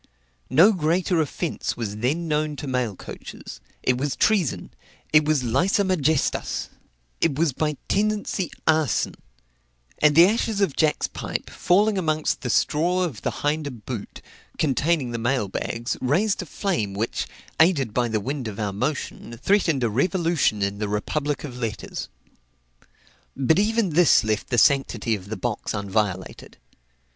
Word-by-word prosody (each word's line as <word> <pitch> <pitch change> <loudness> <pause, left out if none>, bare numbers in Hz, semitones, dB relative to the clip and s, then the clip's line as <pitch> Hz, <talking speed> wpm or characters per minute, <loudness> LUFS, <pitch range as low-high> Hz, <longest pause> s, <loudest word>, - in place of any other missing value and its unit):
No 165 - +6
greater 175 0 +1
offence 155 +2 -3
was 105 -3 -4
then 145 +10 -1
known 150 -1 0
to 145 - -6
mail 125 -6 -1
coaches; - - -10 0.2
it 125 -1 +1
was 145 +1 -1
treason, 200 - +1 0.4
it 155 -1 +6
was 150 -4 +2
læsa 175 - +2
majestas, 160 -6 0 0.5
it 165 -4 +1
was 160 -3 +2
by 150 +1 -1
tendency 205 -2 0 0.2
arson; 155 -5 +2 0.9
and 150 -1 +4
the 170 +2 +9
ashes 220 +1 0
of 195 -9 +1
Jack's 155 -2 +2
pipe, - - -5
falling 200 +3 +2
amongst 155 -3 0
the 125 - -3
straw 175 +9 +2
of 150 - -4
the - - 0
hinder 150 0 -1
boot, 120 -3 -7 0.3
containing 150 -2 +1
the 115 - -3
mail 120 -2 0
bags, 115 +5 -3
raised 195 +12 +1
a 180 - -8
flame 150 - -2
which 110 +4 -2 0.3
(aided 150 - +3
by 120 0 +1
the 110 -2 0
wind 130 +3 -4
of 105 -1 -6
our 105 -2 -2
motion) 120 0 -4
threatened 165 - +2
a 115 - +2
revolution 165 - +1
in 100 +1 -2
the 105 -1 -2
republic 145 +8 -2
of 125 -4 -7
letters. 110 -4 -4 1.3
But 150 +6 +3
even 215 -2 +1
this 165 -3 +5
left 110 -2 -1
the 120 - 0
sanctity 125 -3 +3
of 100 -2 -5
the 110 - -4
box - - -3
unviolated. 100 -2 -2
145 Hz, 150 wpm, -24 LUFS, 115-170 Hz, 1.3 s, the